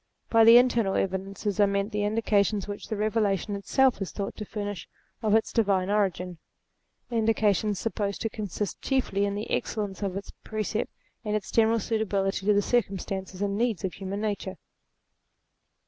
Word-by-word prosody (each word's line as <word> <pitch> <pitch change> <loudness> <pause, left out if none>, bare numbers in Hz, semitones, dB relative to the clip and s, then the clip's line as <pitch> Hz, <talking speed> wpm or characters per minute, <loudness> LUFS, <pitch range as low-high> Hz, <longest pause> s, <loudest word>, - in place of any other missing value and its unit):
By 225 -1 +6
the 230 +1 +10
internal 235 -5 +3
evidences 195 +2 -2
are 205 - +6
meant 200 +1 -1
the 210 0 -1
indications 210 -2 +1
which 205 0 -6
the 220 - -2
Eevelation 210 -2 0
itself 255 +5 +2
is 195 - -3
thought 200 -1 -4
to 210 - -5
furnish 205 -2 -5 0.3
of 215 -2 +3
its 220 - +1
divine 200 -4 +2
origin; 185 -4 0 0.7
indications 215 -3 +2
supposed 205 -1 -2
to 225 - -1
consist 205 -1 -4
chiefly 250 -7 +1
in 200 0 -2
the 210 +2 -5
excellence 205 -3 -2
of 195 -2 -2
its 200 - -7
precepts, 215 0 -3 0.3
and 210 -1 -1
its 200 -3 -3
general 225 0 +4
suitability 200 -3 -1
to 210 - +6
the 205 - +3
circumstances 195 -4 -1
and 200 0 0
needs 230 -7 0
of 190 - -2
human 195 +1 -5
nature. 205 -3 -3
205 Hz, 160 wpm, -27 LUFS, 195-220 Hz, 0.7 s, the